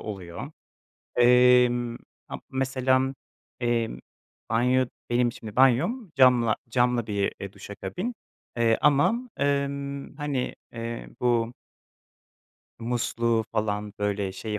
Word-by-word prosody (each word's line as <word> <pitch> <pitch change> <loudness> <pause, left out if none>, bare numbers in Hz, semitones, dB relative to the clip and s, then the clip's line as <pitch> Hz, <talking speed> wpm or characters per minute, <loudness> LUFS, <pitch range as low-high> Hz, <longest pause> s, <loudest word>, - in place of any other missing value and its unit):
oluyor. 100 - -7 0.7
Emm, 125 -1 +5 0.3
a - - -5
mesela, 130 0 +1 0.5
emm, 115 - 0 0.5
banyo 125 +3 +3 0.2
benim 120 0 +2
şimdi 110 -3 -10
banyom 160 - +3
camla 125 -4 +5
camlı 120 -1 +1
bir, 100 -1 0
eee, 100 0 -7
duş - - -12
kabini 185 - -3 0.7
ama, 180 - +3
ımm, 140 0 -1
hani, 145 -4 -2 0.2
eee, 115 0 -5
bu 120 -1 +1 1.3
musluğu 115 -1 0
falan, 105 -1 -1
böyle, 100 -2 -1
şeyi, 105 +2 -4
120 Hz, 100 wpm, -26 LUFS, 115-135 Hz, 1.3 s, Emm